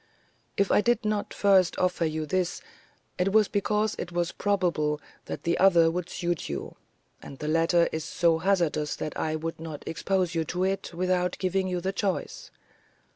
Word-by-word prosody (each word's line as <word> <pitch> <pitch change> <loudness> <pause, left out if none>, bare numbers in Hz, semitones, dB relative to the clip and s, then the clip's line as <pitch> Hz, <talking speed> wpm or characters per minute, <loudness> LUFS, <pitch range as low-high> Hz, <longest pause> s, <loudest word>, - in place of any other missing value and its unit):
If 200 -1 +2
I - - +5
did 235 -1 +1
not 210 -1 -1
first 195 -3 +3
offer 180 -2 +1
you 155 0 -2
this, 180 +2 -1 0.6
it 185 +2 +2
was 215 0 +5
because 210 +1 0
it 180 - -5
was 175 0 -1
probable 170 -7 0 0.3
that - - -6
the 170 0 0
other 170 -4 +5
would 180 +1 -4
suit 175 -3 -2
you, 70 -1 -5 0.5
and 135 - -10
the 150 - -5
latter 165 +2 +3
is 160 0 -3
so 165 0 +2
hazardous 165 -5 +1
that 155 - -5
I 155 0 -1
would 165 +1 -4
not 160 -3 -7
expose 180 +1 0
you 165 -1 0
to 180 +3 -2
it 195 +1 -1
without 180 0 0
giving 190 0 0
you 180 -1 -2
the 190 +2 -2
choice. 205 - -3
180 Hz, 180 wpm, -27 LUFS, 165-195 Hz, 0.6 s, I